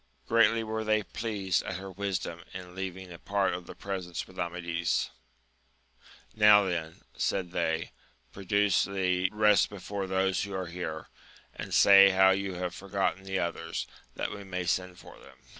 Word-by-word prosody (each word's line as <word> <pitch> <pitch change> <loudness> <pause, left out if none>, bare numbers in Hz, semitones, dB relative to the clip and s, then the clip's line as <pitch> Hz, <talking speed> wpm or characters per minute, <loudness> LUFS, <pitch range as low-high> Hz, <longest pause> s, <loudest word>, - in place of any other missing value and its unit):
Greatly 115 0 +4
were 110 0 -3
they 110 0 +2
pleased 100 -5 -1
at 95 - -5
her 95 0 -8
wisdom 95 -3 -4
in 90 -1 -8
leaving 95 -1 -6
a 85 - -11
part 100 -2 0
of 90 0 -6
the - - -9
presents 95 -3 -5
with 95 - -14
Amadis; 85 -1 -1 1.2
Now 105 -1 +7
then, 80 -4 -3
said 90 -3 -1
they, 80 -2 -1 0.4
produce 100 +2 +2
the 95 -2 0
rest 105 -1 +4
before 100 -1 -5
those 95 0 +1
who 100 -1 -4
are 95 -1 -2
here, 85 -3 -6 0.4
and - - -7
say 100 0 +8
how 95 0 +5
you 95 -1 -1
have 90 0 -3
forgotten 95 -1 -2
the 95 0 -2
others, 85 -2 -3 0.3
that - - -3
we 105 -1 -7
may 90 -2 -4
send 90 +1 -1
for - - -14
them. - - -16
95 Hz, 160 wpm, -29 LUFS, 90-100 Hz, 1.2 s, say